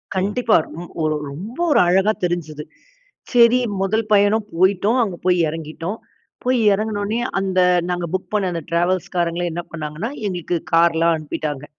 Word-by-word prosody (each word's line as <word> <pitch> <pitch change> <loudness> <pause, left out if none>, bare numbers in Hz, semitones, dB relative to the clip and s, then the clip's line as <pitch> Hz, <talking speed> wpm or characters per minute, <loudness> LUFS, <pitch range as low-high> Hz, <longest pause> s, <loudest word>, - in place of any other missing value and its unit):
கண்டிப்பா. 210 +4 +1
ரொம் 170 +2 -9
ஒரு 155 0 +1 0.2
ரொம்ப 200 - -8
ஒரு - - +5
அழகா 190 +4 +3
தெரிஞ்சுது. 160 -4 -2 0.7
சரி 240 0 +6 0.2
முதல் 220 +3 0
பயணம் 205 +1 +3
போயிட்டோம், 195 +7 +2
அங்கே 190 -6 -4
போய் 180 -1 +3
இறங்கிட்டோம். 165 +5 -5 0.5
போய் 255 0 +2
இறங்குனொனே, 210 +1 -2 0.2
அந்த 190 -1 0 0.3
நாங்க 175 -1 -1
புக் 185 +2 -3
பண்ண 205 -2 +1
அந்த 170 -1 -3
ட்ராவல்ஸ்காரங்கள 175 0 0
என்ன 170 +2 -4
பண்ணாங்கன்னா, 155 +6 -5 0.2
எங்களுக்கு 180 -2 -3 0.2
கார்லாம் 165 0 +4
அனுப்பிட்டாங்க. 150 -2 -5
180 Hz, 135 wpm, -20 LUFS, 165-205 Hz, 0.7 s, சரி